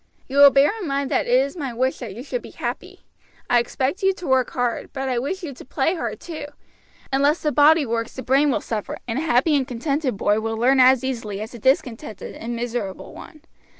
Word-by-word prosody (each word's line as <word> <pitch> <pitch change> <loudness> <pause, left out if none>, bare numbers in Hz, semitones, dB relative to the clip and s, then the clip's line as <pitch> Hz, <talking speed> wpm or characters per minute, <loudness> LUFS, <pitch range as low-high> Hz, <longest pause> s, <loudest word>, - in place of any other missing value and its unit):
"You 270 - -4
will 285 0 +10
bear 275 +1 +4
in 360 - -4
mind 275 -1 -2
that - - +1
it 245 +1 +4
is 275 +4 -1
my 275 -8 -5
wish 260 +2 0
that 220 -6 -7
you 240 - -7
should 485 - -4
be - - -11
happy. - - -6 0.5
I 245 - +4
expect 265 - -2
you 385 0 +3
to 365 -2 -10
work 260 -2 +2
hard, 245 -2 -2
but 270 -1 -3
I 250 -2 0
wish 360 +10 -4
you 295 -5 -5
to - - -12
play 275 +5 0
hard 345 - -4
too. 315 -4 -7 0.7
Unless 285 +4 +2
the 300 - +1
body 295 +1 +5
works 230 -1 -3
the 260 - -6
brain 275 +3 +3
will 270 - 0
suffer, 215 -3 -4
and 235 +3 -2
a - - -2
happy 300 0 +2
and 270 -3 0
contented 265 0 -2
boy 205 +2 +2
will 225 0 -3
learn 260 +4 +3
as 255 0 +6
easily 230 -6 -3
again 205 - -4
as 220 - -10
a 240 - -9
discontented, 230 -4 -1
and 235 +1 -5
miserable 230 -5 -4
one. 310 - -12
260 Hz, 235 wpm, -22 LUFS, 235-285 Hz, 0.7 s, will